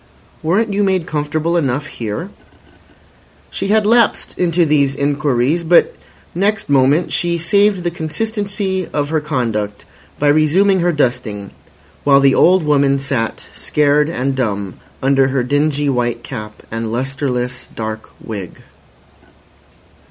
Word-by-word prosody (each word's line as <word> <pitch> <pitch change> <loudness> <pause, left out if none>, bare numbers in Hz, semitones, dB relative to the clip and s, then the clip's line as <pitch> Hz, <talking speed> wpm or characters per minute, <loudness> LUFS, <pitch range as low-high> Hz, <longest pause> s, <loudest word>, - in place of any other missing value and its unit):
"Weren't 200 +7 +1
you 205 +1 +1
made 190 -4 +1
comfortable 155 +2 -1
enough 145 -3 0
here?" 120 - -5 1.2
She 195 - -3
had 215 +1 +3
lapsed 230 +1 +2
into 175 -1 +2
these 140 -3 +2
inquiries, 145 +2 0
but 170 +1 +4 0.4
next 200 -1 -1
moment 140 +5 +3
she 170 -1 0
saved 200 +2 +2
the 175 - -1
consistency 195 +2 -2
of 145 -1 -1
her 160 -1 0
conduct 115 -8 -3 0.3
by 145 - +2
resuming 175 +6 +3
her 175 0 +2
dusting, 115 - -2 0.5
while 140 -1 +5
the 135 -1 +4
old 185 +4 +4
woman 140 -2 +3
sat 135 -4 -3
scared 150 0 +1
and 135 -3 -2
dumb 100 -7 -3 0.2
under 135 0 +3
her 135 -1 0
dingy 145 +2 0
white 120 -3 -1
cap 105 -1 -8
and 115 0 -3
lustreless 125 0 -3
dark 110 0 -5
wig. 100 -6 -8
145 Hz, 130 wpm, -17 LUFS, 125-175 Hz, 1.2 s, while